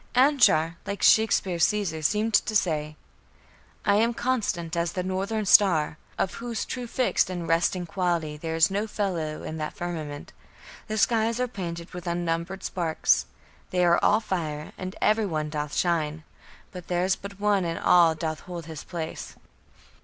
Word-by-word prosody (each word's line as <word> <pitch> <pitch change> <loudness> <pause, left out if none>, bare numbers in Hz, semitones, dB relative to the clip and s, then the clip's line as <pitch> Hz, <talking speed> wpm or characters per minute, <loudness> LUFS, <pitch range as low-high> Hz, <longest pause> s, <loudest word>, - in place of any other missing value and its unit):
Anshar, 245 - +4
like 200 0 -4
Shakespeare's 195 -6 +4
Caesar, 195 -7 -2
seemed 215 +7 +1
to 215 +1 +2
say: 155 -6 0 0.9
I 200 0 +4
am 230 +2 +2
constant 205 -11 -1
as 170 0 -1
the 180 - -2
northern 195 +4 -2
star, 165 -6 +4 0.2
Of 190 - -1
whose 235 -3 -3
true 250 -1 -5
fixed 250 -5 +1
and 175 -2 -4
resting 175 +2 +1
quality 170 -4 -1
There 160 +2 -4
is 165 +2 +4
no 205 +3 -1
fellow 175 -8 -3
in 160 - -5
the 155 -1 -3
firmament. 155 -5 -6 0.5
The 215 -1 -3
skies 225 +2 +2
are 250 - +1
painted 170 -6 -6
with 180 0 -7
unnumbered 170 +2 -2
sparks; 165 -3 +1 0.4
They 180 -1 +2
are 170 0 +4
all 215 +2 +4
fire, 155 -7 -3
and 185 +1 -6
every 215 0 +3
one 155 -3 -2
doth 150 -1 -3
shine; 160 -3 0 0.5
But 180 -2 -9
there's 180 +2 +1
but 200 0 -10
one 205 -2 +2
in 165 -1 -2
all 170 -2 +5
doth 160 -1 -3
hold 175 -3 -8
his 160 -2 -8
place. 165 -3 -6
175 Hz, 160 wpm, -26 LUFS, 160-205 Hz, 0.9 s, all